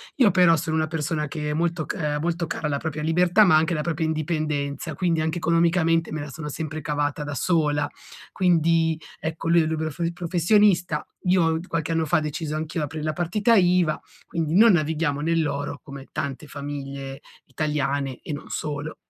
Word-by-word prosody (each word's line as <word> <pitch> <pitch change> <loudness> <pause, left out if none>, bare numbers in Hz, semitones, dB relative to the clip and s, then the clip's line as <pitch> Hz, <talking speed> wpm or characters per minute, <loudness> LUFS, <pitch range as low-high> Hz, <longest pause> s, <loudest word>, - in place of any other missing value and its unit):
Io 250 -7 +5
però 175 -3 +5
sono 160 0 -2
una 155 0 +1
persona 155 -1 -2
che 150 -1 -3
è - - -1
molto 165 0 -1
c 150 -5 -2
molto 170 +1 -1
cara 165 - -4
alla 140 -1 0
propria 155 -2 -4
libertà, 180 +5 +4
ma 180 - +5
anche 160 +3 +3
alla 150 -2 -1
propria 160 -1 -1
indipendenza, 155 -3 -2
quindi 170 -3 +1
anche 160 +2 -1
economicamente 165 0 +2
me 155 - -3
la 145 - -6
sono 150 +2 -6
sempre 155 +1 -5
cavata 145 +1 -1
da 145 -1 -5
sola. 150 -3 +1 0.5
Quindi, 165 -3 +2 0.2
ecco, 160 +1 -4
lui 170 0 +5
è - - +1
libero 160 +1 -2
professionista. 180 +2 +2 0.2
Io 165 -3 +3
qualche 165 0 -2
anno 160 -1 +1
fa 150 - +2
ho - - +3
deciso 155 0 -3
anch'io 155 0 -3
aprir 150 +1 -5
la 155 0 -1
partita 205 +7 +2
iva, 180 -4 +3 0.3
quindi 165 -1 -2
non 220 0 +7
navighiamo 155 -2 0
nell'oro, 150 -3 -1
come 140 -2 -10
tante 145 0 -4
famiglie 140 -1 -6 0.2
italiane 140 -1 -2
e 150 - -5
non 145 - -7
solo, 150 0 -4
160 Hz, 180 wpm, -24 LUFS, 150-170 Hz, 0.5 s, non